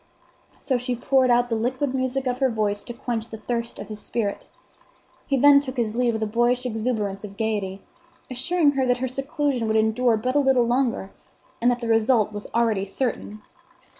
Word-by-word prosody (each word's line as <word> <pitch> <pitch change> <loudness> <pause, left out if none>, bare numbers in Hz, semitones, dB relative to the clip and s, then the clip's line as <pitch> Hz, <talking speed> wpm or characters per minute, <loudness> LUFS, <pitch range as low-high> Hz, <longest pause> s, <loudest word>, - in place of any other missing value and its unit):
So 260 -3 -1
she 250 0 -2
poured 260 +1 +2
out 245 0 +3
the 230 - 0
liquid 255 +4 -1
music 260 0 -1
of 250 0 -1
her 265 -1 +3
voice 210 -3 -1
to 240 - -6
quench 230 -2 -4
the 220 - -7
thirst 235 +1 -4
of - - -7
his 210 0 -7
spirit. 210 -2 -3 0.8
He 275 - +1
then 285 +2 +7
took 270 -2 -6
his 225 -2 -1
leave 245 -1 +2
with 220 0 -2
a - - +1
boyish 240 +3 +1
exuberance 220 -4 -2
of 200 -1 -9
gayety, 205 -3 -2 0.4
assuring 290 +5 +2
her 270 -2 0
that 245 0 +2
her 260 +1 -2
seclusion 275 -2 -2
would 220 0 +2
endure 220 +2 +2
but 255 +5 -2
a - - +5
little 265 -3 +3
longer, 240 -5 0 0.5
and 240 - +4
that 245 0 0
the 235 - -3
result 225 -1 +3
was 205 0 -6
already 225 -4 +1
certain. 215 0 -4
240 Hz, 195 wpm, -24 LUFS, 220-260 Hz, 0.8 s, then